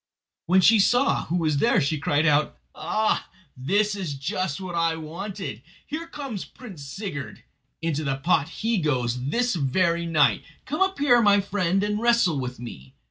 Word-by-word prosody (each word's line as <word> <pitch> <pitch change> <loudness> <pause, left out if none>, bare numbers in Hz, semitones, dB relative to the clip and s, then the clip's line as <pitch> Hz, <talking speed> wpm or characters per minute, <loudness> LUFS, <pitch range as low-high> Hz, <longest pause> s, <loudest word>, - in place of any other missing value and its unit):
When 185 +2 +5
she 220 +4 +6
saw 245 +7 +3
who 170 - -2
was 155 -4 +1
there 230 +2 +3
she 150 0 0
cried 145 +2 +1
out: 150 0 +2 0.2
"Ah, 215 +7 -1 0.3
this 200 +11 +1
is 180 -8 -4
just 140 +4 -3
what 185 -2 -6
I 165 -1 +1
wanted! 170 - -6 0.2
Here 320 +3 -5
comes 275 - -6
Prince 200 - -11
Sigurd. 145 -1 -7 0.4
Into 155 -2 -1
the 135 -2 -1
pot 145 +1 +1
he 225 +3 -1
goes 125 -5 -1
this 245 +8 +1
very 170 +3 +1
night. 155 -4 +3 0.2
Come 305 +6 -3
up 385 0 +2
here, 250 -4 +4
my 205 -2 +5
friend, 195 -1 0
and 210 +1 -1
wrestle 235 -11 +3
with 125 -2 -5
me." 65 - -10
175 Hz, 170 wpm, -24 LUFS, 145-210 Hz, 0.4 s, she